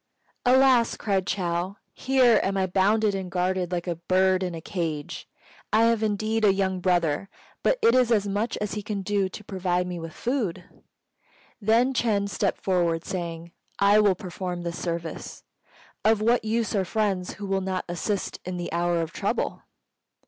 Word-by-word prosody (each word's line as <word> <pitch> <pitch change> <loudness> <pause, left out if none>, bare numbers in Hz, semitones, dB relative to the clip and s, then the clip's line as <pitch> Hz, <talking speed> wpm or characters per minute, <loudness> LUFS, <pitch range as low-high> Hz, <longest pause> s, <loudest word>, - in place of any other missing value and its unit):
"Alas!" 255 -2 +5
cried 195 -3 -1
Chou, 175 0 -1 0.2
"here 255 -4 +4
am 195 0 -1
I 190 - +2
bound 195 +4 +2
and 195 -3 0
guarded, 180 0 -1
like 175 -1 -2
a 175 - -1
bird 185 +2 +2
in 180 -2 -2
a - - -5
cage. 160 -4 -4 0.4
I 220 +1 +4
have 230 -1 +3
indeed 220 +1 0
a 205 - +6
young 190 -1 0
brother, 175 -1 +1 0.3
but - - +2
it 455 - +6
is 250 -2 +3
as 205 -3 +2
much 205 +4 -1
as 210 -2 -3
he 210 - -3
can 205 -1 -4
do 200 -1 0
to 210 - -9
provide 180 -2 -1
me 180 -1 -5
with 165 -1 -7
food." 240 -8 -2 1.0
Then 230 +5 +3
Ch'êng 210 -5 +1
stepped 200 - -1
forward, 175 -3 +1
saying, 170 -2 -5 0.3
"I 200 +1 +5
will 205 -3 +4
perform 180 -2 -5
this 170 0 -4
service. 170 -1 -5 0.6
Of 220 0 +4
what 230 +3 +2
use 225 +1 -1
are 200 -3 +1
friends 195 -2 -1
who 205 - -7
will 195 0 0
not 185 -1 -2
assist 180 +3 -3
in 180 0 -4
the 175 -1 -5
hour 170 0 +1
of 165 - -7
trouble?" - - -2
190 Hz, 175 wpm, -26 LUFS, 175-215 Hz, 1.0 s, a